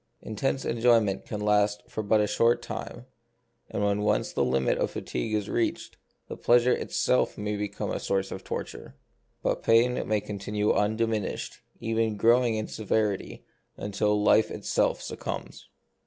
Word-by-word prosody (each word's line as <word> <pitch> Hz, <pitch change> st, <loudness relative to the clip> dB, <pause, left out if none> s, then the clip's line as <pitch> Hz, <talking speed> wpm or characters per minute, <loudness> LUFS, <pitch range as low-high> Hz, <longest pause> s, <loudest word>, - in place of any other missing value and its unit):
Intense 135 Hz, +5 st, -2 dB
enjoyment 115 Hz, -5 st, +2 dB
can 105 Hz, -, -4 dB
last 105 Hz, 0 st, +2 dB
but -, -, -26 dB
for 110 Hz, 0 st, +1 dB
a 105 Hz, -, +3 dB
short 115 Hz, +3 st, +2 dB
time, -, -, -7 dB, 0.6 s
and 105 Hz, -, -2 dB
when 100 Hz, 0 st, +1 dB
once 105 Hz, -, 0 dB
the -, -, +1 dB
limit 65 Hz, +1 st, +1 dB
of -, -, +1 dB
fatigue 60 Hz, -, -3 dB
is 105 Hz, -1 st, -1 dB
reached, 115 Hz, -, -2 dB, 0.3 s
the -, -, -6 dB
pleasure 120 Hz, +1 st, +4 dB
itself 65 Hz, -, 0 dB
may 105 Hz, 0 st, -2 dB
become 105 Hz, 0 st, -3 dB
a -, -, -2 dB
source 95 Hz, 0 st, -1 dB
of 95 Hz, -, -6 dB
torture; -, -, -6 dB, 0.5 s
but -, -, 0 dB
pain 120 Hz, +2 st, +3 dB
may 110 Hz, 0 st, +2 dB
continue 105 Hz, +1 st, -2 dB
undiminished, 110 Hz, 0 st, -1 dB, 0.2 s
even 115 Hz, -1 st, 0 dB
growing 115 Hz, +2 st, +4 dB
in 110 Hz, 0 st, -2 dB
severity, 105 Hz, -2 st, -2 dB, 0.3 s
until 105 Hz, +1 st, 0 dB
life 110 Hz, +1 st, +4 dB
itself -, -, 0 dB
succumbs. -, -, -6 dB
105 Hz, 150 wpm, -27 LUFS, 105-115 Hz, 0.6 s, pleasure